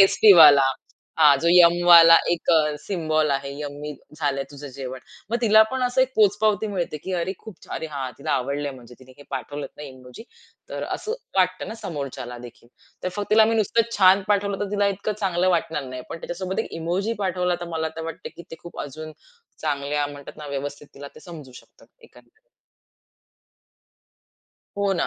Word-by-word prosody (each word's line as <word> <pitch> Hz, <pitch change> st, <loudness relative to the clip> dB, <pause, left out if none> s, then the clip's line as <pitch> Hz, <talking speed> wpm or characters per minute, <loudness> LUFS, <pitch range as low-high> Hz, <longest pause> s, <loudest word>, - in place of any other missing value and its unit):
टेस्टीवाला, 155 Hz, -9 st, +7 dB, 0.5 s
हा 150 Hz, -3 st, +7 dB
जो 170 Hz, -, +2 dB
यम्मिवाला 170 Hz, -1 st, +7 dB, 0.2 s
1 175 Hz, 0 st, 0 dB, 0.3 s
सिम्बॉल 155 Hz, -4 st, -1 dB
आहे 140 Hz, 0 st, -2 dB
यम्मी 150 Hz, 0 st, -6 dB, 0.2 s
झालंय 140 Hz, -3 st, -1 dB
तुझं 145 Hz, 0 st, -10 dB
जेवण. 130 Hz, -1 st, -6 dB, 0.3 s
मग 235 Hz, -, +1 dB
तिला 220 Hz, -2 st, +6 dB
पण 260 Hz, -1 st, -2 dB
असं 250 Hz, +1 st, +1 dB
एक 260 Hz, -, -2 dB
पोचपावती 210 Hz, 0 st, +2 dB
मिळते, 180 Hz, -6 st, -3 dB
की 190 Hz, +6 st, -7 dB
अरे 175 Hz, +2 st, -2 dB
खूप 220 Hz, -5 st, -12 dB
छान! -, -, -8 dB
अरे 160 Hz, -, -5 dB
हा 135 Hz, -3 st, -4 dB
तिला -, -, -4 dB
आवडलंय, 140 Hz, +3 st, -2 dB
म्हणजे 125 Hz, -1 st, -14 dB
तिने 130 Hz, 0 st, -17 dB
हे 145 Hz, -, -12 dB
पाठवलत 145 Hz, +2 st, -5 dB
ना -, -, -10 dB
इमोजी 130 Hz, -, -11 dB, 0.5 s
तर -, -, -5 dB
असं 430 Hz, -, -5 dB, 0.2 s
वाटतं 185 Hz, 0 st, +1 dB
ना 220 Hz, -, -6 dB
समोरच्याला 135 Hz, -6 st, -6 dB
देखील. 120 Hz, -1 st, -13 dB, 0.3 s
तर 185 Hz, -, -1 dB
फक्त 205 Hz, 0 st, -4 dB
तिला 220 Hz, 0 st, +6 dB
मी 225 Hz, -, +1 dB
नुसतं 225 Hz, +1 st, +1 dB
छान 190 Hz, 0 st, +5 dB
पाठवलं, 200 Hz, -1 st, 0 dB
तर 205 Hz, -, -3 dB
तिला 205 Hz, -1 st, +1 dB
इतकं 200 Hz, +2 st, -3 dB
चांगलं 185 Hz, -2 st, +1 dB
वाटणार 165 Hz, -4 st, -1 dB
नाही 130 Hz, -1 st, -7 dB
पण -, -, -6 dB
त्याच्यासोबत 185 Hz, +2 st, -5 dB
1 -, -, -4 dB
इमोजी 185 Hz, +7 st, -1 dB
पाठवला 180 Hz, -2 st, -1 dB
तर 175 Hz, -, -5 dB
मला 160 Hz, 0 st, -1 dB
तर 160 Hz, -, -5 dB
वाटतं, 165 Hz, -, -7 dB
की -, -, -10 dB
ते 165 Hz, -, -8 dB
खूप 175 Hz, -, -9 dB
अजून 155 Hz, +2 st, -8 dB, 0.5 s
चांगल्या 145 Hz, -1 st, -1 dB
म्हणतात 145 Hz, -1 st, -11 dB
ना, 150 Hz, -, -9 dB
व्यवस्थित 145 Hz, +1 st, -6 dB
तिला 140 Hz, 0 st, -9 dB
ते -, -, -14 dB
समजू 155 Hz, -7 st, -11 dB
शकत -, -, -17 dB, 0.2 s
एकंदरीत. 440 Hz, -1 st, -22 dB, 2.4 s
हो 200 Hz, -1 st, +1 dB
ना, -, -, +1 dB
165 Hz, 180 wpm, -23 LUFS, 145-195 Hz, 2.4 s, टेस्टीवाला